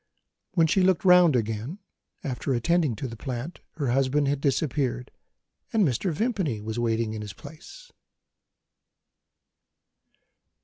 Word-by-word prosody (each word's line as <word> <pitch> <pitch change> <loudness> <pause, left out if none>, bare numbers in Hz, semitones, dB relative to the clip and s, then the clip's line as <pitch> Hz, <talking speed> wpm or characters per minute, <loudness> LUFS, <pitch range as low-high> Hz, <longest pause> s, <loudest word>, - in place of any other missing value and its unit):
When 165 -3 +5
she 185 +4 +2
looked 190 +2 +2
round 180 -5 +7
again, 115 - -2 0.5
after 130 0 -2
attending 155 0 +1
to 130 +5 -4
the 115 - -8
plant, 125 +7 -5
her 145 -5 -2
husband 135 +2 +2
had 140 0 0
disappeared, 135 -3 -1 0.6
and 215 -6 +3
Mr. 140 - -1
Vimpany 180 - -1
was 110 +2 -4
waiting 115 -1 0
in 110 - -5
his 105 -2 -7
place. 165 - -13
140 Hz, 125 wpm, -26 LUFS, 120-170 Hz, 0.6 s, round